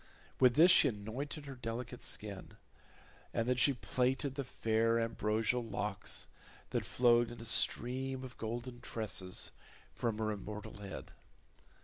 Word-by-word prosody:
With 125 -2 +6
this 170 +5 +8
she - - +7
anointed 130 +8 -4
her 140 - -6
delicate 120 0 -5
skin, 100 -3 -4 0.8
and 115 - +1
then 125 0 +2
she 140 +3 +5
plaited 125 +5 0
the 140 0 -3
fair 115 -1 +1
ambrosial 115 +1 0
locks 105 -3 -2 0.4
that - - 0
flowed 120 -1 +4
in 120 - -9
a 115 - -6
stream 130 +4 +2
of 125 -2 -8
golden 120 +2 -5
tresses 95 -5 -2 0.4
from 115 -3 -1
her 110 -1 0
immortal 105 +1 -7
head. 95 -10 -8
115 Hz, 135 wpm, -35 LUFS, 110-125 Hz, 0.8 s, this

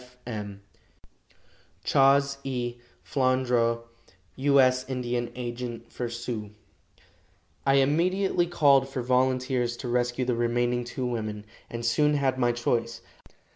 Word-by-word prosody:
B. 125 - -16
C. 125 - -22
F. 125 -1 -9
M. 100 -2 -6 1.2
"CHAS. 140 0 +4
E. 120 -2 -3 0.3
FLANDRAU, 125 -3 +1 0.5
"U. 140 +1 +4
S. 130 -1 +4
Indian 120 -2 -2
Agent 120 -1 -6
for 120 -1 -4
Sioux." 115 -2 -5 1.2
I 135 - +5
immediately 175 +6 +2
called 140 -6 +4
for 130 -2 -4
volunteers 125 -1 +1
to 125 - -6
rescue 120 +1 0
the 125 - +1
remaining 120 +1 0
two 125 +1 -4
women, 110 -3 -3 0.2
and 115 0 -5
soon 150 +6 +3
had 135 -2 0
my 120 -1 +3
choice. 120 -1 -1
125 Hz, 130 wpm, -27 LUFS, 120-135 Hz, 1.2 s, I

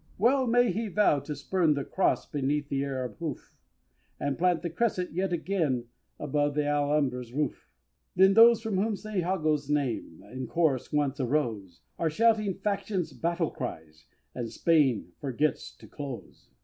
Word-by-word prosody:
Well 255 +5 +3
may 245 0 +4
he 225 +1 -2
vow 195 -6 +3
to 150 +2 -6
spurn 155 +2 +1
the 140 - -2
Cross 190 - 0
Beneath 145 0 -1
the 135 0 0
Arab 130 -3 -4
hoof, 155 -6 -6 0.7
And 140 -1 -1
plant 175 0 +1
the 170 - -3
Crescent 185 -1 -1
yet 185 +2 -1
again 160 -9 -1 0.3
Above 145 -1 -1
th' 150 - +2
Alhambra's 145 -4 0
roof 145 - -3 0.5
When 190 +2 +6
those 230 +1 +7
from 220 -4 -1
whom 210 +2 +1
St. 215 -1 -4
Jago's 155 -5 0
name 130 - -2
In 130 0 -5
chorus 155 -6 0
once 145 -2 0
arose, 115 - -2 0.2
Are 165 - +1
shouting 215 +2 +2
Faction's 200 -3 -2
battle 170 -1 -1
cries, 80 - -7 0.3
And 120 -3 -5
Spain 130 - +2
forgets 145 +2 -1
to - - -15
"Close!" 140 -4 -9
150 Hz, 155 wpm, -28 LUFS, 135-190 Hz, 0.7 s, those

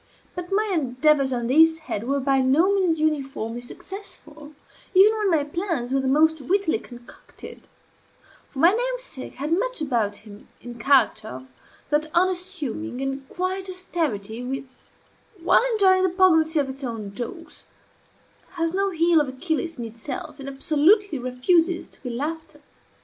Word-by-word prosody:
But 355 0 -7
my 420 +1 +1
endeavors 275 -1 +2
on 240 -2 -2
this 320 +6 +5
head 235 -9 -5
were 280 +2 0
by 270 0 +2
no 305 +10 +3
means 360 -5 +1
uniformly 270 -7 -2
successful, 310 0 -9 0.4
even 410 +4 +7
when 425 -2 0
my 320 -5 +2
plans 295 -5 -3
were 270 - +2
the 265 - -1
most 315 +3 +3
wittily 355 - +1
concocted; 240 +1 -13 0.8
for - - -14
my 335 +6 +6
namesake - - -4
had 290 +4 -4
much - - -1
about 235 -9 0
him, 205 0 -13
in 240 0 -10
character, 235 -4 +3
of 130 -4 -9 0.4
that 300 +1 +1
unassuming 345 -7 -1
and 270 0 -4
quiet 370 +1 -3
austerity 290 - -3
which, 265 +2 -4 0.8
while - - +5
enjoying 380 -3 +4
the 375 - +3
poignancy 330 -4 +3
of 280 - 0
its 270 +1 -7
own 220 -5 -5
jokes, 250 +10 -8 0.9
has 330 -2 -1
no 395 +1 +1
heel 335 -2 +3
of 290 - -2
Achilles 320 +4 -3
in 240 - -5
itself, 230 +6 -7
and 275 0 -6
absolutely 310 +5 +2
refuses 325 +8 +1
to - - -12
be 250 - -5
laughed 310 +6 -5
at. 295 - -19
305 Hz, 155 wpm, -24 LUFS, 260-360 Hz, 0.9 s, even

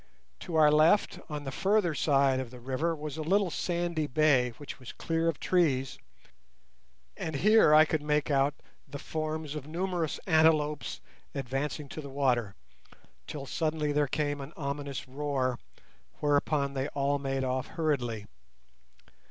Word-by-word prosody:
To 170 - -6
our 155 -1 +6
left, 155 +7 +4
on 150 -1 -4
the 135 - -5
further 195 +2 +2
side 140 -3 +2
of 130 -2 -4
the 125 +1 -11
river, 135 +7 -1
was 150 -1 -6
a - - -3
little 190 +3 +2
sandy 170 -2 -1
bay 135 -3 +3
which 145 - -9
was 130 - -9
clear 165 0 -1
of 165 -3 0
trees, 140 -8 +1 1.2
and 160 - -4
here 210 -1 +5
I 155 +1 +8
could 155 -1 -1
make 150 0 0
out 140 +1 +2 0.3
the 145 - -7
forms 155 0 -4
of 150 -2 -6
numerous 170 -1 -2
antelopes 155 -3 +2 0.3
advancing 140 +3 -3
to 155 - -6
the 140 - -8
water, 125 -7 0 0.7
till 145 -2 -6
suddenly 155 0 -1
there 145 0 +2
came 145 0 -1
an 135 +4 -9
ominous 140 -2 -4
roar, 130 -2 -1 0.6
whereupon 145 -1 +1
they 135 0 -1
all 140 0 +1
made 135 -1 -2
off 130 0 -1
hurriedly. 130 -10 -1
150 Hz, 150 wpm, -29 LUFS, 135-160 Hz, 1.2 s, I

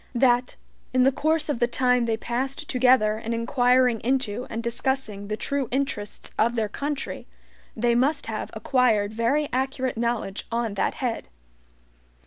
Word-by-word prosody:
That, 245 0 +3 0.4
in 255 - +5
the 270 - +5
course 310 +3 0
of 290 -6 -1
the 240 - +3
time 250 -1 +2
they 225 -1 0
passed 260 +5 -3
together 250 -4 +3
in 230 +1 -3
inquiring 245 0 +3
into 250 -1 -1
and 230 +1 -4
discussing 235 -4 -2
the 215 +1 -3
true 280 +1 -2
interests 250 -6 -3
of 235 +2 +3
their 220 -2 0
country, 285 +5 -4 0.5
they 235 +1 +2
must 265 +6 +1
have - - -4
acquired 220 -6 +2
very 250 +7 +1
accurate 260 -1 -1
knowledge 235 -4 -2
on 230 -2 -1
that 200 - -1
head. 245 -4 -3
245 Hz, 150 wpm, -25 LUFS, 230-265 Hz, 0.5 s, in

